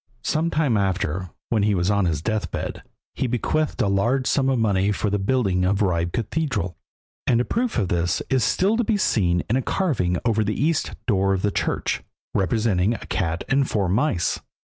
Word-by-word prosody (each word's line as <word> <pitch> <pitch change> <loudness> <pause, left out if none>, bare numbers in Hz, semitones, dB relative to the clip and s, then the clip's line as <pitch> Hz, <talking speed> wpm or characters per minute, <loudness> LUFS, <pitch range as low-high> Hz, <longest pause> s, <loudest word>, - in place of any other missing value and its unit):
Some 160 +2 0
time 150 -9 +1
after, 95 -2 -1 0.2
when 110 -3 +2
he 105 0 +2
was 90 +2 +1
on 100 -2 +2
his 80 -3 -1
deathbed, 110 0 -3 0.3
he 130 - -1
bequeathed 135 +6 0
a - - +1
large 115 +7 +1
sum 135 0 +2
of 130 - +2
money 100 -3 +2
for 105 0 -1
the 105 - +1
building 95 -4 +1
of 100 +2 +2
Ribe 85 -2 0
Cathedral, 115 - -2 0.5
and 120 - +4
a 125 - +1
proof 240 - -1
of 100 -6 0
this 85 0 +1
is 130 -3 +2
still 200 +4 +2
to 240 - +2
be 215 -1 +1
seen 90 - +1
in 120 - +1
a - - +1
carving 115 - 0
over 110 -2 +2
the 105 +1 -2
east 155 +2 0
door 95 -4 +2
of 95 - -4
the 105 - +2
church, - - -1 0.3
representing 100 +1 +1
a - - -9
cat 85 -4 -2
and 135 0 +2
four 100 -3 0
mice. 100 - +1
105 Hz, 195 wpm, -23 LUFS, 95-130 Hz, 0.5 s, and